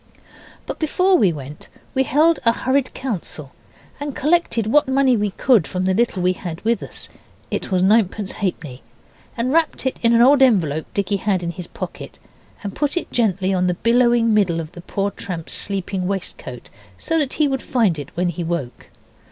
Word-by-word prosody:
But - - -6
before 365 +4 +2
we 205 - +4
went 145 -1 -9 0.2
we 265 - +2
held 310 +5 +3
a 230 - +6
hurried 260 +2 0
council 175 - -5 0.5
and 285 -1 -5
collected 300 -7 +1
what 290 +7 +3
money 265 -1 +3
we 210 -2 0
could 210 - +2
from 185 0 -3
the 190 - +2
little 205 -3 0
we 180 0 +3
had 175 -3 -6
with 230 +1 0
us - - -7 0.4
(it - - -3
was 185 -1 +2
ninepence 205 -1 +2
halfpenny), 155 -10 -4 0.6
and 250 +3 0
wrapped 325 -4 +1
it 260 - -1
in 235 0 +4
an 230 - +5
old 275 +2 +5
envelope 165 - +3
Dicky 200 0 0
had 190 -2 0
in 170 - -2
his 180 -1 -8
pocket - - -8 0.5
and 200 -2 -5
put 290 +2 -1
it - - -3
gently 195 -5 +1
on 180 -1 +1
the 180 - 0
billowing 235 +1 +3
middle 190 -6 +2
of 160 -1 -6
the 175 - -11
poor 200 +3 -2
tramp's 175 -6 -6
sleeping 195 -2 -3
waistcoat, 175 -10 -6 0.3
so 325 - 0
that 280 -4 -1
he 305 -1 +2
would 270 -1 -1
find 210 - +1
it 145 - -7
when 180 0 +1
he 175 +1 -4
woke. 165 -7 -4
205 Hz, 190 wpm, -21 LUFS, 180-260 Hz, 0.6 s, a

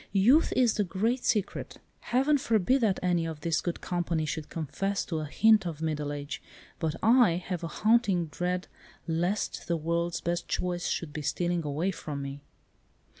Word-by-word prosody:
"Youth 240 +11 +5
is 245 -4 +4
the 210 - +1
great 220 +7 -1
secret. 205 -3 -1 0.2
Heaven 275 +4 +2
forbid 240 0 +2
that 210 -5 +2
any 175 -2 +1
of 160 -2 -6
this 165 +1 0
good 175 - -3
company 170 -3 -1
should 155 0 -4
confess 170 +6 -2
to 160 -3 -2
a 155 - -3
hint 215 +4 +4
of 160 -3 -5
middle 150 -2 -2
age, 145 +1 -5 0.4
but 160 -1 -1
I 235 -4 +6
have 175 0 -4
a - - -2
haunting 210 -3 +2
dread 180 +3 -2 0.4
lest 175 +5 -1
the 170 - +1
world's 170 +2 -1
best 170 0 -2
joys 175 -1 -1
should 155 -4 -3
be 150 - -4
stealing 175 +3 -1
away 155 +6 -1
from 145 -5 -5
me." 140 +1 -6
175 Hz, 175 wpm, -29 LUFS, 160-205 Hz, 0.4 s, I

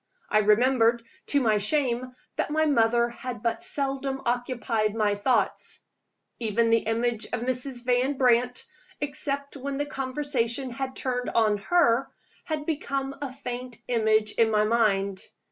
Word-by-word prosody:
I - - +5
remembered, 230 +2 +3 0.2
to 285 - +3
my 220 -5 +2
shame, 255 +1 0 0.2
that - - -1
my 310 +1 +2
mother 235 -4 +3
had 240 0 -7
but 230 +7 0
seldom 275 -6 -2
occupied 235 -3 -1
my 210 -2 +2
thoughts. 205 +5 0 0.6
Even 230 0 +1
the 230 - +5
image 230 0 0
of - - -4
Mrs. 250 0 -2
Van 255 +3 +1
Brandt 245 -1 +2 0.3
except 280 -1 -2
when 275 +1 -4
the 290 - -1
conversation 265 -2 -1
had 260 +2 -4
turned 250 -1 -2
on 215 -2 +2
her 250 0 +2 0.4
had 310 -2 -3
become 275 -3 -2
a 280 -3 -3
faint 250 -2 -6
image 220 -3 +2
in 225 -1 +3
my 210 -1 +3
mind! 200 -4 +1
245 Hz, 145 wpm, -26 LUFS, 230-275 Hz, 0.6 s, I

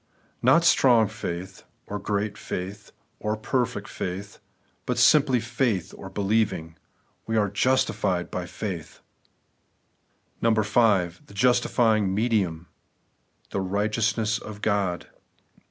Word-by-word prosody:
Not 130 +7 +5
strong 120 -9 +5
faith, 95 -4 -6 0.2
or 105 - -5
great 105 +1 -2
faith, 100 +2 -6 0.3
or 105 +1 -2
perfect 125 +2 -1
fidth, 95 +3 -6 0.5
but - - -1
simply 140 -5 +5
faith, 115 -4 -1
or 95 - -9
believing. 100 -5 0 0.2
* - - -41
We 115 0 0
are 105 -2 +2
justified 105 -6 +1
by 90 -1 -4
faith.' 90 -3 -6 1.4
6. 115 -1 +4
The 100 -5 +1
justifying 110 -3 +2
medium;— 100 -7 0 0.9
The 100 - -1
righteousness 110 +3 0
of 105 -1 -10
God. 100 -4 0
105 Hz, 105 wpm, -25 LUFS, 95-115 Hz, 1.4 s, Not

